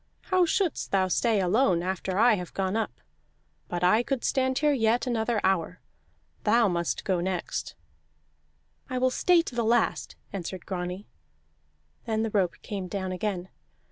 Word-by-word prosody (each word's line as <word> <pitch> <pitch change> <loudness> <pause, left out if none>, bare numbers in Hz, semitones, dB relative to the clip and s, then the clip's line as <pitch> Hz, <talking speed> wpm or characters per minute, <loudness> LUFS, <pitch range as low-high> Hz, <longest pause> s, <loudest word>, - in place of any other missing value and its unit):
How 365 -2 +4
shouldst 360 -2 0
thou 190 -1 +2
stay 225 +2 +2
alone 185 -1 +2
after 185 0 -2
I 230 +2 +6
have 180 -4 -4
gone 190 +1 -1
up? 225 -1 -3 0.7
But 175 0 -3
I 215 +6 +5
could 260 0 -2
stand 260 -1 +1
here 300 -1 +3
yet 230 -2 +2
another 235 -2 0
hour. 180 -1 0 0.6
Thou 230 +1 +4
must 170 -1 -2
go 185 -3 +1
next." 185 -1 -3 1.1
"I 255 - -2
will 255 0 +2
stay 345 +4 +4
to 265 - -7
the 240 -1 0
last," 230 +1 +1 0.2
answered 185 -1 -5
Grani. 180 +1 -4 1.0
Then 220 -1 0
the 225 - -2
rope 190 -4 +1
came 195 -3 -4
down 190 0 -3
again. 185 -1 -3
210 Hz, 155 wpm, -27 LUFS, 185-240 Hz, 1.1 s, I